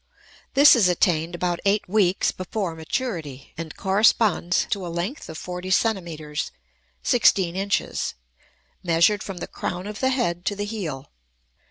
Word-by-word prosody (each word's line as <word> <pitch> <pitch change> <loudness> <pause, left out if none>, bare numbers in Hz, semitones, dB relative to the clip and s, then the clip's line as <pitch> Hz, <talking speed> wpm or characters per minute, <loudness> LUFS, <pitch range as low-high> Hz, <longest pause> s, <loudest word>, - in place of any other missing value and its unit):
This 280 0 +8
is 210 -7 +4
attained 175 -2 +1
about 175 0 -1
eight 200 +1 +1
weeks 190 -1 +2
before 185 -1 -4
maturity, 160 - -4
and 165 -2 -7
corresponds 195 -2 +3
to 200 -3 -1
a - - -4
length 175 - -4
of 160 - -7
forty 180 +2 -6
centimeters 170 -8 -1 0.5
(16 195 -8 +3
inches), 200 +1 -1 0.7
measured 175 +4 +3
from 195 -2 -6
the 175 - -4
crown 180 +1 -4
of 210 0 -6
the 260 - +2
head 205 -10 -1
to 205 - 0
the 205 +1 -3
heel. 175 -11 -5
185 Hz, 145 wpm, -24 LUFS, 170-210 Hz, 0.7 s, This